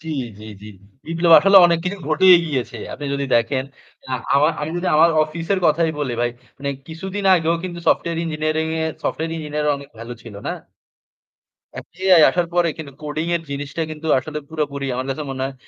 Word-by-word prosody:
জ্বী, 160 -1 -7 0.3
জ্বী, 110 - -11
জ্বী। 105 - -10 0.4
বিপ্লব 165 0 +2
আসলে 195 +1 +5
অনেক 170 -1 +2
কিছু 195 +2 -3
ঘটেই 180 +4 +7
গিয়েছে। 130 -4 -3 0.2
আপনি 145 - -6
যদি 140 0 -2
দেখেন, 130 +3 0 0.5
আ - - -3 0.2
আমা 145 +3 +5
আমি 150 +2 -3
যদি 175 - -3
আমার 165 +2 +6
অফিসের 165 +5 -2
কথাই 160 +1 +2
বলি 135 -4 -2
ভাই 120 - +1 0.3
মানে 140 0 -3 0.2
কিছুদিন 190 +5 -6
আগেও 165 -1 +1
কিন্তু 175 -2 -5
সফটওয়্যার 170 0 +1
ইঞ্জিনিয়ারিং 155 0 -1
এ - - 0 0.2
সফটওয়্যার 165 +1 -2
ইঞ্জিনিয়ারিং 150 -1 -2
অনেক 140 0 -12
ভালো 115 +1 -7
ছিল 115 -4 -11
না? - - -1 1.3
এ - - -2 0.3
AI 165 - +8
আসার 175 -1 0
পরে 175 -1 +3
কিন্তু 145 -3 -8
কোডিং 155 +2 -3
এর 165 - -7
জিনিসটা 140 +3 -4
কিন্তু 155 +1 -7
আসলে 150 +3 -5
পুরোপুরি 145 -3 -3
আমার 130 +1 -3
কাছে 145 +3 -3
মনে 130 0 -4
হয় 135 0 -5
155 Hz, 190 wpm, -20 LUFS, 140-165 Hz, 1.3 s, AI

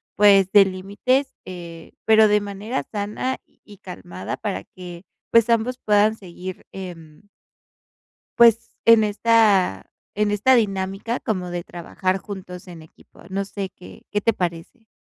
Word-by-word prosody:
pues, 195 -2 +5
de 205 -2 +7
límites". 200 +9 -1
Eh, 170 -3 -10
pero 220 0 +6
de 210 0 +3
manera 205 +5 -4
sana 215 +5 -3
y 205 -1 -19
calmada, 95 - -7
para 205 -3 -4
que 175 -1 -11 0.3
pues, 230 0 +4
ambos 230 +2 +1
puedan 210 +1 +3
seguir, 185 -1 -9
em 165 -5 -10 1.2
pues 230 -1 +5
en 230 -1 +7
esta 210 - +2 0.2
en 210 0 +1
esta 210 +6 +3
dinámica, 195 +1 -1
como 185 -4 -3
de 175 -1 -4
trabajar 185 +2 -3
juntos 185 -2 -9
en 170 -2 -10
equipo. 155 - -20
No 195 +1 -2
sé, 195 -1 -5
¿qué, 180 - -15
qué 205 - 0
te 230 - +2
parece? 180 +6 -5
200 Hz, 140 wpm, -22 LUFS, 180-220 Hz, 1.2 s, de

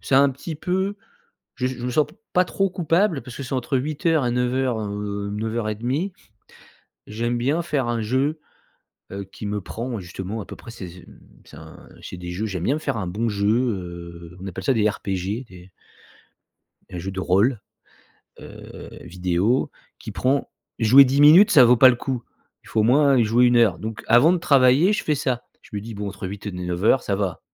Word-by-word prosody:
c'est 135 - -1
un 140 +1 +5
petit 145 +5 -7
peu 190 +5 -2 0.6
je 125 - -1
je 130 -1 -5
me 125 - -2
sens 150 +4 +2 0.3
pas 180 0 +4
trop 195 +1 0
coupable 175 -2 +1
parce 125 - -10
que 140 - -6
c'est 130 - -7
entre 130 +1 -1
8:00 155 0 0
et - - +1
9:00, 125 -1 0
heu, 100 -1 -4
9:30, 115 - -2 1.0
j'aime 120 +3 -2
bien 140 +8 0
faire 140 -7 -1
un 120 -1 -1
jeu, 135 +8 0 0.7
heu, 100 0 -5
qui 95 +2 -10
me 105 0 -2
prend 115 +4 -5
justement 95 +4 -6
à - - -8
peu - - -9
près, - - -13
c'est 95 -5 -8
c'est 90 +1 -14 0.4
c'est - - -14
un - - -14
c'est 90 - -8
des 90 0 -7
jeux, 100 +5 -3
j'aime 95 -5 -4
bien 140 +10 +1
faire 135 - -3
un 95 -4 -3
bon 105 +6 -2
jeu, 100 0 -1
heu, 90 -7 -3
on 95 - -7
appelle 95 0 -7
ça 135 - +2
des 105 -1 +3
RPG, 100 +4 -3
des 90 0 -14 1.2
un 90 - -6
jeu 95 +3 -5
de 95 0 -5
rôle, 100 +7 +2 0.8
heu, - - -11
vidéo 90 - 0 0.3
qui - - -8
prend 135 +2 0 0.3
jouer 125 +5 +7
10 135 +2 +1
minutes, 165 +8 +8
ça 130 - +7
vaut 120 +1 +5
pas 130 +2 +8
le 125 - +3
coup, 125 -1 -4 0.4
il - - -16
faut 110 - 0
au - - +4
moins 135 +2 +4
jouer 115 +3 +3
1 120 0 +3
heure, 115 -5 +3
donc 110 -2 -6
avant 120 +9 +6
de 180 - +1
travailler 140 +4 +4
je 210 - -2
fais 150 - +1
ça, 130 -3 -2 0.2
je - - -20
me - - -3
dis 115 +1 -8
bon 100 0 -4
entre 95 - -7
8:00 100 +1 -6
et - - -6
9:00 90 +8 +1
ça 100 - -1
va. 95 -4 -3
120 Hz, 205 wpm, -22 LUFS, 100-135 Hz, 1.2 s, minutes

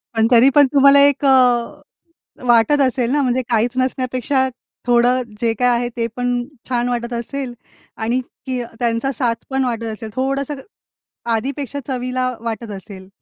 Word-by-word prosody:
पण, 225 0 +3
तरी 245 +3 +7
पण, 290 -2 +7
तुम्हाला 280 0 +7
एक 285 0 0
अ, 250 -3 +3 0.7
वाटत 240 +5 +4
असेल 255 -2 +1
ना, 290 +1 +2
म्हणजे 255 -1 +1
काहीच 235 +2 +1
नसण्यापेक्षा 255 +1 0 0.4
थोडं 245 +1 +3 0.2
जे 230 -1 +1
काही 250 - +3
आहे 240 0 -2
ते 230 - 0
पण 245 0 -1 0.4
छान 245 -1 0
वाटत 240 0 -3
असेल 245 +2 -4 0.5
आणि 240 +3 +1 0.3
की 255 -2 -2 0.2
त्यांचा 235 +2 0
साथ 240 -2 0
पण 265 0 0
वाटत 230 -2 -2
असेल. 220 0 -8
थोडंसं 275 +2 -1 0.8
आधीपेक्षा 275 +4 -3
चवीला 255 0 -2 0.2
वाटत 225 -1 -4
असेल? 190 -2 -12
250 Hz, 150 wpm, -19 LUFS, 235-265 Hz, 0.8 s, तरी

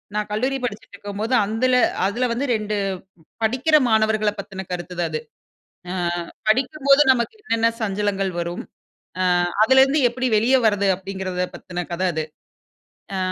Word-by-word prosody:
நான் 210 0 -2
கல்லூரி 260 +6 0
படிச்சுட்டுருக்கும்போது, 205 +1 -5
அந்துல 250 +5 +1 0.3
அதுல 240 +6 0
வந்து 265 +4 -2
2 215 0 -2 0.7
படிக்கிற 260 +8 +2
மாணவர்கள 215 -1 +2
பத்தின 195 -1 -7
கருத்து 180 0 -5
தான் 170 -2 0
அது. 155 - -2 0.7
"அ - - -3 0.6
படிக்கும்போது 275 +4 +4
நமக்கு 245 - -2
என்னென்ன 230 - +1
சஞ்சலங்கள் 200 -2 -1
வரும்? 170 +1 -4 0.6
அ - - +2 0.4
அதுலருந்து 265 +4 +5
எப்படி 255 +1 -2
வெளிய 245 +5 +3
வரது?" 200 -2 +2
அப்படீங்கிறத 190 -1 -4
பத்தின 175 -1 -6
கதை 185 +2 -1
அது. 155 0 -1 0.9
அ - - -2
215 Hz, 130 wpm, -22 LUFS, 195-255 Hz, 0.9 s, அதுலருந்து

